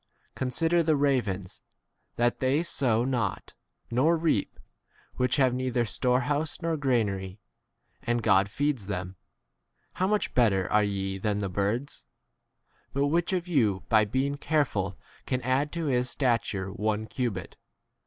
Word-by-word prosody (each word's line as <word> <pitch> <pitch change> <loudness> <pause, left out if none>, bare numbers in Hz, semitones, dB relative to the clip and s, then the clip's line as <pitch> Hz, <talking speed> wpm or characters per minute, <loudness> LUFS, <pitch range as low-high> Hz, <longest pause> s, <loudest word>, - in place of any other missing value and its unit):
Con 130 - -2
sider 165 +6 +2
the 160 -1 +2
ravens, 120 -10 -1 0.5
that 120 0 +2
m - - -37
they 135 +5 +2
sow 120 -8 +1
not, 120 -7 -2 0.4
nor 150 +8 +3
reap; 160 -11 0 0.6
which 125 0 +2
have 130 -3 +3
neither 125 -1 0
storehouse 140 +8 0
nor 165 -1 -1
granary; 105 -9 -1 0.6
and 120 -1 -1
God 100 -2 +4
feeds 140 -4 -1
them. 95 -2 -4 0.8
How 185 - 0
much 210 +1 0
better 110 -6 +3
25 - - 0
are 105 - +5
ye 95 -1 -2
than 105 +1 0
the 100 -2 -2
birds? 105 +9 -2 0.9
But 140 +1 +1
which 170 +4 +1
of 180 -2 -1
you 110 - +1
by 110 -2 +5
being 135 +6 -1
careful 115 - 0 0.3
can 125 - 0
add 135 +4 +1
26 - - -14
to 165 -1 -2
his 125 -3 +1
stature 115 -7 0
one 105 +1 -1
cubit 110 -6 -4
125 Hz, 150 wpm, -28 LUFS, 105-145 Hz, 0.9 s, are